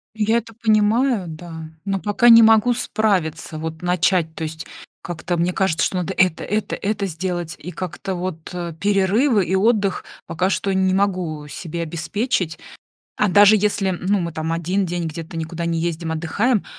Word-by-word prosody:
Я 220 +1 +2
это 230 -1 -5
понимаю, 220 0 +2
да, 160 0 -8 0.2
но 195 -1 -1
пока 220 +5 +3
не 230 0 +9
могу 225 +2 +5
справиться, 180 -10 -1
вот 160 0 -6
начать. 175 -2 +1
То 160 - -5
есть 160 0 -6 0.3
как-то 175 0 -4
мне 175 +2 0
кажется, 190 -4 +1
что 185 - -2
надо 180 +1 -2
это, 180 -2 +2
это, 215 +1 -2
это 205 -1 -2
сделать 175 -1 -4
и 180 - -8
как-то, 185 +1 -5
вот, 175 -3 -5
э, 175 -2 -4
перерывы 205 +4 +2
и 190 - 0
отдых 205 -1 +1 0.2
пока 175 +3 0
что 200 - -1
не 190 0 +2
могу 180 -6 -1
себе 170 +2 -6
обеспечить. 170 +3 -2 0.6
А 210 - +2
даже 205 +3 +7
если, 205 -1 +1
ну 185 +2 0
мы, 170 -1 -3
там, 160 +1 -3
1 180 +4 0
день 175 -1 -3
где-то 165 +1 -7
никуда 165 +1 -4
не 165 -1 0
ездим, 165 -1 -2
отдыхаем, 200 +8 0
185 Hz, 170 wpm, -21 LUFS, 165-205 Hz, 0.6 s, не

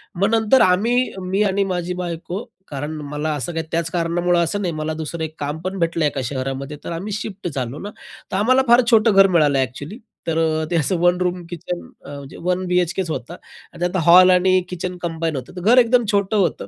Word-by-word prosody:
मग 200 +4 +1
नंतर 225 +4 +4
आम्ही, 230 +8 +2
मी 190 +2 -1
आणि 200 0 +1
माझी 180 0 -3
बायको, 175 +4 -5 0.2
कारण 145 +2 -5 0.2
मला 150 +1 -2
असं 155 +4 -4
काही 160 0 -3
त्याच 165 0 -1
कारणामुळं 175 0 +1
असं 205 +5 -2
नाही, 175 -3 -2
मला 155 0 -3
दुसरं 160 +1 -5
एक 155 0 -6
काम 145 +2 -3
पण 185 +1 -4
भेटलं 165 -2 0
एका 140 -2 -1
शहरामध्ये 135 +2 -4
तर - - -6
आम्ही 185 +6 -5
शिफ्ट 200 -2 -5
झालो 130 +1 -4
ना. 205 - -6 0.4
तर 190 - -1
आम्हाला 255 +6 +4
फार 240 +2 +6
छोटं 225 -1 +5
घर 195 0 +7
मिळालं 150 -6 +3
एक्चुअली. 145 - -4 0.3
तर 165 0 0 0.3
ते - - +1
असं 170 +3 +1
वन 175 +1 +3
रूम 180 -1 -1
किचन 175 +1 -5 0.3
म्हणजे 140 -1 -9
वन 180 +1 -1
बी-एच-केच 180 0 0
होता, 155 +2 -5 0.4
आणि 170 - -13
त्यात 180 +1 -1
हॉल 180 +2 +8
आणि 185 +1 +4
किचन 180 0 -5
कंबाईन 165 -2 -2
होतं. 130 +6 -7
तर 180 - -6
घर 230 +7 +4
एकदम 245 0 +4
छोटं 200 +1 +1
होतं. 170 - 0
175 Hz, 205 wpm, -20 LUFS, 155-190 Hz, 0.4 s, हॉल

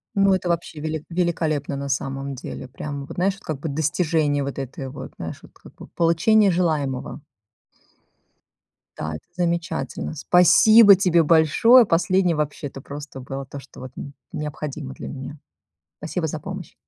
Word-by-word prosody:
Ну, 195 -1 +4
это 185 -1 -1
вообще 170 -2 -2
велик 155 0 -4
великолепно 160 -5 -1
на 140 0 -5
самом 135 0 -3
деле. 130 0 -7
Прям 140 +2 -6
вот, - - -10
знаешь, 190 +2 0
как 155 -8 -5
бы 160 - -4
достижение 150 -1 0
вот 140 0 -5
этой 135 0 -6
вот, 135 - -9
знаешь, - - -6
вот - - -16
как - - -17
бы - - -12
получения 190 +5 +3
желаемого. 155 -6 -1 1.8
Да, 80 0 -4
это - - -10
замечательно. 170 -2 -2
Спасибо 200 +6 +7
тебе 180 -3 +3
большое, 165 - +6
последнее 180 0 +2
вообще-то 145 -2 -4
просто 145 0 -9
было 135 +1 -6
то, 140 +1 -9
что 135 - -15
вот 130 -1 -8
н 140 - -8 0.2
необходимо 150 -2 -5
для - - -8
меня. 140 +2 -7 0.6
Спасибо 160 +1 -3
за 155 - -4
помощь. 185 +1 -8
155 Hz, 155 wpm, -23 LUFS, 140-175 Hz, 1.8 s, Спасибо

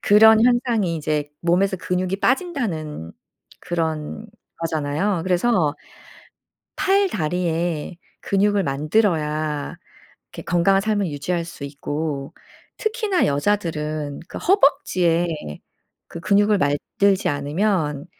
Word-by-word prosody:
그런 220 +2 +6
현상이 240 -7 +2
이제 150 -1 -2
몸에서 185 +3 +2
근육이 180 +1 -2
빠진다는 200 - -1 0.5
그런 160 +4 -3 0.3
거잖아요. 165 +3 -1
그래서 180 -4 +2 1.0
팔다리에 175 - 0 0.3
근육을 200 0 +1
만들어야 150 -1 0 0.6
이렇게 - - -8
건강한 185 +3 +3
삶을 205 -3 0
유지할 165 +4 -2
수 165 -4 -9
있고. 140 0 -4 0.5
특히나 435 -4 +1
여자들은 150 -2 -1
그 - - -7
허벅지에 185 - +2 0.8
그 170 - -9
근육을 205 +2 +3
만들지 185 +6 +1
않으면 150 +1 -1
175 Hz, 240 characters per minute, -22 LUFS, 150-205 Hz, 1.0 s, 그런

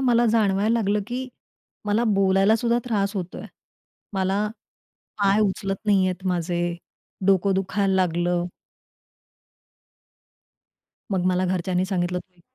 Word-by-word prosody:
मला 240 -2 +3
जाणवायला 215 -1 +2
लागलं 210 -2 +1
की 255 +2 -4 0.6
मला 210 +3 +1
बोलायला 195 +2 +4
सुद्धा 235 +1 +1
त्रास 205 -3 -1
होतोय. 180 -1 -5 0.7
मला 195 +2 0 0.7
पाय 200 +1 +3
उचलत 195 -1 0
नाहीहेत 185 -2 +2
माझे, 175 -1 -1 0.5
डोकं 195 0 +3
दुखायला 195 0 0
लागलं. 175 -1 +1 2.7
मग 180 -2 0
मला 185 0 +2
घरच्यांनी 180 0 0
सांगितलं 180 -2 -1
की 180 -2 -29
195 Hz, 105 wpm, -24 LUFS, 180-210 Hz, 2.7 s, बोलायला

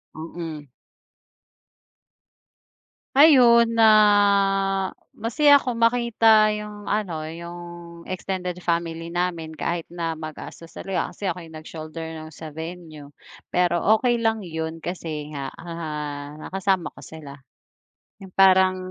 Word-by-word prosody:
Mm. 160 -2 -7 2.5
Ayun, 240 -6 +7
na, 225 -1 +5 1.3
masaya 285 +6 +5
ako 255 -3 -3
makita 230 -2 +4
yung 210 -1 -7
ano, 180 -7 -2
yung 170 +2 -8 0.5
extended 180 -1 -4
family 170 -1 -2
namin, 175 -2 -2
kahit 170 -1 -3
na 170 -1 -3
magastos 160 +1 -9
talaga. 190 -2 -2
Kasi 205 - -8
ako 180 -1 -2
yung 160 -1 -11
nag-shoulder 155 +1 -8 0.2
no'ng 155 - -9
sa 155 0 -10
venue, 160 -2 -8 0.4
pero 175 -1 +1 0.2
okey 240 0 +1
lang 225 -3 0
'yon 160 -1 -4
kasi 165 -3 -5
nga, 140 -1 -4
ah, 150 -3 -6
nakasama 190 +1 -2
ko - - -14
sila. 155 -3 -10 0.9
Yung 190 - -13
parang, 190 -1 +5
175 Hz, 110 wpm, -23 LUFS, 160-210 Hz, 2.5 s, Ayun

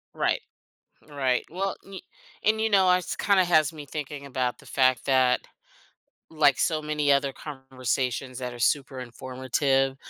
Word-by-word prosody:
Right, - - +1 0.7
right. 135 -4 0
Well, 190 +3 -2
y 195 -2 -9 0.4
and 220 +1 +3
you 220 - +2
know, 190 -3 +4
is 180 0 0
kinda 195 -2 +3
has 155 -3 +3
me 150 -2 -9
thinking 145 0 -6
about 125 -2 -2
the - - -17
fact 130 -2 +2
that 130 -2 +3 0.9
like 150 -4 +3
so 155 -2 +1
many 150 -1 0
other 140 -1 +3
conversations 130 -2 -3
that 125 -1 -4
are 120 - -10
super 135 +2 0
informative, 130 +2 -1
140 Hz, 150 wpm, -26 LUFS, 130-155 Hz, 0.9 s, know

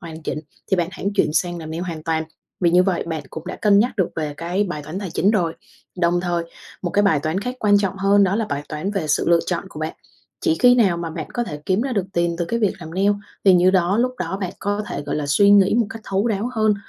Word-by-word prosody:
hoàn 160 -1 -9
chỉnh, - - -3 0.3
thì 190 - +3
bạn 175 -2 0
hãng 200 +1 -3
chuyển 195 - +2
sang 175 +2 0
làm 160 -1 -7
nail 165 +2 -4
hoàn 165 -4 -5
toàn, 160 0 -1 0.4
vì 175 - +3
như 180 +1 +5
vậy 185 -2 0
bạn 160 -3 -3
cũng 160 +2 -8
đã - - -5
cân 205 -2 +4
nhắc 230 +2 +1
được 190 -4 +1
về 150 -2 -3
cái 180 +5 -1
bài 175 -6 -5
toán 155 +6 -6
tài 195 -4 -5
chính 195 +4 +2
rồi. 175 -7 0 0.4
Đồng 175 0 +2
thời, 175 -1 -1 0.4
một 175 - -1
cái 205 - +2
bài 160 -8 +3
toán 160 +5 -1
khác 250 +4 -4
quan 205 -1 +4
trọng 195 -1 -1
hơn 200 +1 +4
đó 195 +2 +1
là 225 - -1
bài 145 0 -2
toán 155 +6 -3
về 195 -6 -2
sự 145 - +1
lựa 170 0 +5
chọn 175 0 -2
của 155 - -9
bạn, 155 +1 -3 0.5
chỉ 330 - +2
khi 245 0 +7
nào 200 -8 +3
mà 170 -1 -4
bạn - - -6
có 240 - -1
thể 150 -8 -7
kiếm 190 +2 +2
ra 265 0 -2
được 200 -5 0
tiền 170 0 0
từ 175 - 0
cái 230 +8 -2
việc 210 - +2
làm 165 -1 -8
nail 195 +2 +3 0.3
thì 190 -2 +7
như 180 +1 +5
đó 185 +1 +2
lúc 250 +1 +1
đó 190 - -3
bạn 185 -2 -3
có 205 +1 -1
thể, 145 - -4
gọi - - -3
là, 150 -1 -2
suy 200 +8 +4
nghĩ 200 0 +6
một 235 -2 +2
cách 225 0 -8
thấu 195 +3 0
đáo 220 +2 -1
hơn 215 -2 +3
185 Hz, 285 wpm, -21 LUFS, 165-205 Hz, 0.5 s, khi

